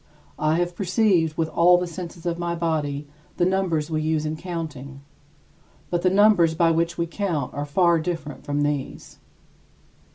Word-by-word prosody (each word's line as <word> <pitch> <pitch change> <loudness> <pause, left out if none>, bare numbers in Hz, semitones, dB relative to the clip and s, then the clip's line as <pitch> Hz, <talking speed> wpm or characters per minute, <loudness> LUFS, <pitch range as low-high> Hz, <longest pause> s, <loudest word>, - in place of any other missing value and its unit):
I 155 +1 +2
have 175 0 -1
perceived 185 -4 +1
with 165 - +1
all 175 +2 +5
the 180 - -1
senses 170 0 -8
of 170 0 -2
my 170 0 -2
body 150 -4 -2 0.3
the 175 - +2
numbers 175 -5 0
we 155 -1 0
use 155 0 0
in 155 +1 -2
counting; 155 -5 -6 0.9
but 175 -1 0
the 185 - +3
numbers 190 -4 +4
by 165 0 +3
which 165 +1 0
we 170 - 0
count 170 -3 -3
are 145 - -3
far 170 +3 +3
different 160 -3 -5
from 145 0 -1
these. 145 -2 -4
165 Hz, 165 wpm, -24 LUFS, 155-175 Hz, 0.9 s, all